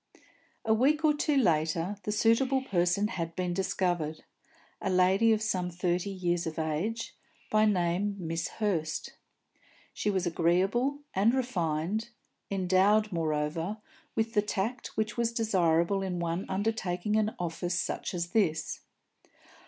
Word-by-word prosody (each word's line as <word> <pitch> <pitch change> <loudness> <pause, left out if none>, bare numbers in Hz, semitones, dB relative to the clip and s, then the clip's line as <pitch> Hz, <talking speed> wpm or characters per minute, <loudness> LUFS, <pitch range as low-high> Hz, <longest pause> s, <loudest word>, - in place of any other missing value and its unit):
A 220 - +4
week 295 +7 +3
or 300 - +5
two 295 0 +1
later 165 - +1
the 210 - -3
suitable 255 +5 +2
person 180 -2 +1
had 165 -6 -4
been 180 -1 -1
discovered 175 -4 -1 0.6
a - - -1
lady 190 +5 +4
of 215 -1 +2
some 185 -4 -1
thirty 180 +2 -1
years 175 -3 -1
of 160 - -5
age, 160 +9 -2 0.4
by 215 0 +4
name 195 0 +1
Miss 165 -2 -3
Hurst. 170 -8 -2 0.8
She 210 - -1
was 190 -3 0
agreeable 190 - +1
and 215 +6 +3
refined, 200 -3 -1 0.4
endowed, 195 +3 +3
moreover, 165 +3 -1 0.4
with 225 0 0
the 210 - +4
tact 210 +4 -3
which 215 0 -1
was 235 -1 +1
desirable 195 -4 +2
in 185 -2 -2
one 170 +2 -2
undertaking 200 -1 -1
an 215 0 +1
office 175 +1 -2
such 175 - -3
as 170 0 -2
this. 175 -6 0
190 Hz, 135 wpm, -29 LUFS, 170-215 Hz, 0.8 s, or